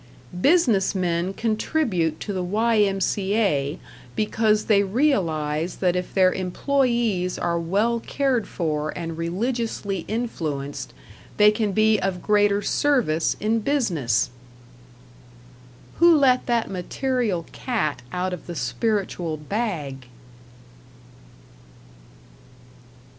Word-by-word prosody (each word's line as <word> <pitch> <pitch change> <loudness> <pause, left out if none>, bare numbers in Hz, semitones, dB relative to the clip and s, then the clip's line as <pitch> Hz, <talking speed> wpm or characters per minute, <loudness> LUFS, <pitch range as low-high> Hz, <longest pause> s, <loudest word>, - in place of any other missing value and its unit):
Business 250 - +3
men 175 0 0
contribute 215 - -1
to 205 - -4
the 185 - -2
Y.M.C.A. 195 -5 +1 0.4
because 215 0 +1
they 205 -2 +4
realize 175 - 0
that 180 -2 +1
if 180 0 -3
their 185 -1 +4
employes 225 -1 0
are 170 0 -1
well 205 +8 +1
cared 260 -2 -1
for 155 -3 -2
and 165 -2 -4
religiously 200 +2 -2
influenced, 155 - -4 0.5
they 210 0 +7
can 215 -1 -1
be 215 +1 +3
of 185 -1 -2
greater 205 -1 +3
service 235 - +1
in 220 +2 +1
business! 170 - 0 1.7
Who 340 0 +6
let 260 -4 +3
that 235 -2 +1
material 200 0 -2
cat 200 - -2
out 180 +1 -2
of 180 - -8
the 175 - -6
spiritual 165 - -2
bag? 150 - -4
195 Hz, 100 wpm, -23 LUFS, 170-230 Hz, 1.7 s, they